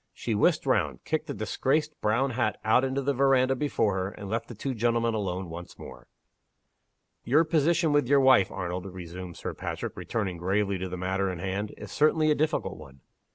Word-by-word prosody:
She 115 - -3
whisked 105 - +2
round, - - 0
kicked - - -2
the - - -3
disgraced 150 +3 -1
brown 120 +6 +1
hat 120 0 -1
out 110 +4 +4
into 135 +1 -1
the 140 +1 +1
veranda 135 0 +3
before 125 -7 0
her, 95 0 -1
and 100 0 -9
left 115 0 -2
the 120 - -9
two 130 +5 -3
gentlemen 115 0 +1
alone 95 -3 -2
once 85 +1 -9
more. - - -11 1.2
"Your 145 +7 +4
position 165 +1 +2
with 145 -4 +3
your 140 +1 +5
wife, 130 -8 +5
Arnold," 90 +1 -4
resumed 90 -1 -8
Sir - - -5
Patrick, - - -5
returning 100 -6 -3
gravely 95 +2 0
to 95 0 -4
the 90 - -5
matter 95 +1 -1
in 90 - -5
hand, 95 +4 -3
"is - - -9
certainly 155 +1 +3
a - - +6
difficult 150 - -1
one." 70 -3 -14
110 Hz, 195 wpm, -27 LUFS, 95-135 Hz, 1.2 s, a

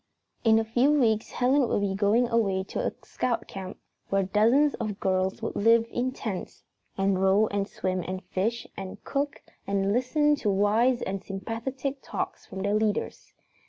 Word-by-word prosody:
In 220 -1 +5
a 225 - +3
few 245 +6 +3
weeks 220 -4 +2
Helen 255 +1 +2
would 205 - 0
be 200 -1 0
going 210 +5 +3
away 200 -5 +1
to - - -5
a - - 0
Scout 245 -2 -2
camp 190 -1 -7 0.3
where 195 0 +2
dozens 230 +10 +3
of 210 -2 -3
girls 190 0 0
would - - -3
live 230 +2 +4
in 255 +1 -1
tents 215 -7 -6 0.3
and 195 -1 +1
row 195 +3 +4
and 200 -1 -1
swim 185 -2 -2
and 185 +1 -4
fish 225 +5 -2
and 190 -1 -8
cook 280 0 -2 0.2
and 200 0 +1
listen 295 +5 +2
to 215 - -1
wise 215 +6 +2
and 195 0 -3
sympathetic 235 +7 -4
talks - - -5
from 190 0 -6
their 200 +1 +1
leaders. 215 -1 -1
215 Hz, 170 wpm, -27 LUFS, 195-245 Hz, 0.3 s, In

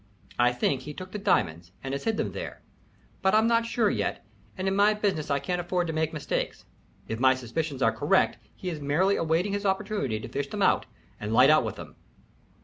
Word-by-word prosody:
I 120 0 +5
think 125 +2 0
he 150 +2 -8
took 185 0 -8
the 210 - -4
diamonds 85 - 0
and 135 0 -4
has 140 - -4
hid 225 -1 +1
them - - -1
there, - - -7 0.6
but 190 +2 +3
I'm 220 +1 +5
not 230 0 +2
sure 230 -2 +1
yet, 100 -2 -2 0.3
and 185 - -2
in 190 - +1
my 205 +1 +4
business 195 -8 -1
I 140 - +2
can't 175 +6 -2
afford 175 0 -1
to 160 - -3
make 160 0 0
mistakes. 150 -3 -3 0.4
If 110 - -4
my 130 0 +5
suspicions 135 +2 -3
are - - +4
correct, - - +2 0.2
he 180 - -4
is 155 -3 -6
merely 170 +8 +2
awaiting 165 +5 0
his 205 0 -2
opportunity 190 - -1
to - - -7
fish - - -3
them - - -1
out - - +3 0.3
and 105 +1 -4
light 125 +5 +6
out 155 - +5
with 110 -3 -4
them." - - -11
160 Hz, 220 wpm, -27 LUFS, 130-195 Hz, 0.6 s, light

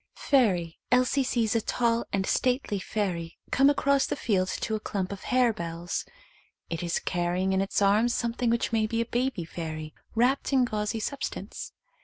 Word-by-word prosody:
Fairy. 185 - +2
Elsie 255 +2 +3
sees 235 -3 0
a 230 - +3
tall 235 +1 +1
and 195 -1 0
stately 250 -5 +1
fairy 180 -5 -3
come 275 +2 +5
across 280 -1 +2
the - - -1
field 190 -5 +1
to 220 - -3
a 215 - 0
clump 195 -3 -3
of 200 - -7
harebells. 175 -9 0 0.7
It 165 - -2
is 170 -1 0
carrying 180 +2 0
in 190 - +2
its 195 +1 0
arms 210 +4 +4
some 235 -1 -1
thing 245 0 0
which 235 +1 +1
may 220 -1 +2
be 230 +1 0
a - - 0
baby 240 -6 -1
fairy, 155 -2 -6 0.2
wrapped 255 +5 +2
in 260 -2 +5
gauzy 215 0 -2
substance. 275 +6 -5
215 Hz, 175 wpm, -28 LUFS, 185-245 Hz, 0.7 s, come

